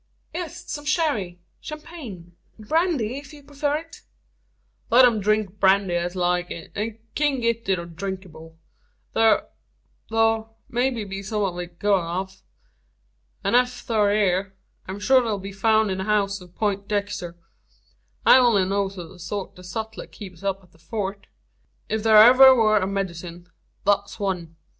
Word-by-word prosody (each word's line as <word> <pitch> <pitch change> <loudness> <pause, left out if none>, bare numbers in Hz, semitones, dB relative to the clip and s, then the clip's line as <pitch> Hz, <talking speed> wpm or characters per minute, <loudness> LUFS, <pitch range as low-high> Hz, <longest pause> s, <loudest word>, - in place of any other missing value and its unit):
"Yes. 340 -2 -6
Some 295 0 -5
sherry 230 - 0 0.2
champagne 275 - -9 0.2
brandy 270 - 0
if 285 +1 -13
you 290 -1 -13
prefer 285 +1 -2
it." 325 +2 -7 0.9
"Let 250 +3 +7
them 235 -3 +5
drink 210 -1 0
brandy 195 -1 +3
as 175 +1 -1
like 180 0 0
it, 165 - -8
and 215 +2 -3 0.2
kin' 290 -3 +1
git 230 -2 -1
it 170 -3 -2
drinkable. 165 -4 -7 0.6
Thur 225 -1 +4 1.2
may 245 +2 +1
be 205 -6 -5
some 210 +1 -2
o' 185 -3 -1
it 175 -1 -7
good 205 +2 +2
enuf; 185 +3 -5 1.0
an - - 0
ef 250 0 +4
thur 215 -3 +1
air, 195 -2 +1 0.3
I'm 190 +2 -5
shor 260 +6 +5
it'll 225 -4 -1
be 195 +1 -7
foun' 215 +1 +2
in 190 - -3
the 190 - -3
house 200 -2 +1
o' - - -11
a - - -16
Peintdexter. 200 -2 -2 0.9
I - - +9
only 230 -7 +4
knows 195 0 -1
o' 175 -2 -7
the 180 +2 -15
sort 190 +3 -5
the 180 - -13
sutler 220 +4 -6
keeps 185 -5 -11
up 195 -1 -2
at 180 - -23
the 160 - -24
Fort. 200 +3 -5 0.6
Ef 220 0 0
thur 220 0 +5
ever 260 +4 +9
wur 215 -3 +4
a 190 - -1
medicine, 175 -3 -4 0.4
thet's 200 0 +1
one. 180 -5 -3
200 Hz, 155 wpm, -24 LUFS, 185-230 Hz, 1.2 s, I